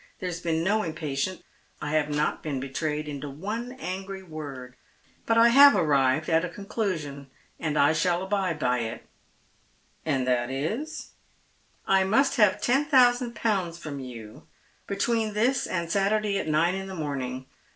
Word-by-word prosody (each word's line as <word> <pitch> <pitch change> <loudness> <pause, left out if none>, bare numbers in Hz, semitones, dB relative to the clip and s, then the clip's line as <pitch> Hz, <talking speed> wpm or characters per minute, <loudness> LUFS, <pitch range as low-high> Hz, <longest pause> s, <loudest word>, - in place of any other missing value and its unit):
There 185 - -4
has 170 -1 -5
been 165 -1 0
no 210 +4 +2
impatience. 155 0 -3 0.4
I 145 - -4
have 155 -1 +1
not 150 +1 0
been 145 -4 -3
betrayed 150 +3 -3
into 145 0 -5
one 220 - -5
angrj' 190 -3 -6
word, 140 -6 -8 0.5
but 230 - +3
I 230 +1 +7
have 280 +3 +8
arrived 140 -1 +2
at 165 +1 +3
a 180 - -2
conclusion, 170 - -4 0.3
and 150 -2 -2
I 145 +2 +5
shall 175 +2 +1
abide 190 -4 -1
by 125 -4 +1
it." 115 -1 -5 0.5
" - - -38
And 135 -4 +1
that 125 -1 +1
is 215 - -4 0.2
" - - -38
" - - -38
1 190 0 +3
must 270 +6 +3
have 210 -4 +4
ten 270 +4 +2
thousand 245 -4 +4
pounds 190 -7 -1
from 150 -4 -7
you 115 -5 -10 0.4
between 215 +1 0
this 245 +5 +1
and 170 -2 -3
Saturday 200 +1 +1
at - - -4
nine 160 +3 +2
in 190 0 -4
the 190 - -7
morning. 130 -5 -4
170 Hz, 170 wpm, -26 LUFS, 145-210 Hz, 0.5 s, have